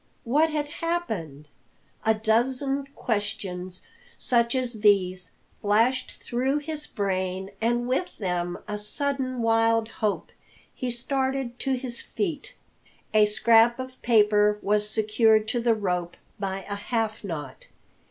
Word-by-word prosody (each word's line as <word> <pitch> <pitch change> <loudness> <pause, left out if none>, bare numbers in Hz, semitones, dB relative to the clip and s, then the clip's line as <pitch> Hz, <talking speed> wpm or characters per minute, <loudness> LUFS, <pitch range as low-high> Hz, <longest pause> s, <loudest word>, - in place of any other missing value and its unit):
What 300 +7 +3
had 300 -1 -1
happened? 225 - -3 0.6
A 220 0 +3
dozen 260 +6 +1
questions 190 -4 -3 0.3
such 235 0 +2
as 250 -3 -1
these 185 -4 +3 0.3
flashed 230 +5 +2
through 260 +4 -1
his 300 0 -5
brain, 190 -2 -2
and 240 +1 +1
with 265 +8 -1
them 175 -3 -2
a 210 0 -3
sudden 255 +2 -1
wild 225 0 +3
hope. 215 -2 -2 0.4
He 255 - -3
started 260 0 -2
to 270 - 0
his 250 -2 -4
feet. 330 -8 -4 0.6
A 215 -1 +6
scrap 225 +2 +5
of 255 0 -8
paper 210 -2 +4
was 210 +1 +2
secured 220 0 +3
to 240 - 0
the 230 -1 +3
rope 180 -4 -2 0.2
by 195 -1 -3
a 205 - -3
half 220 +1 -2
knot. 150 -8 -6
225 Hz, 125 wpm, -26 LUFS, 205-255 Hz, 0.6 s, A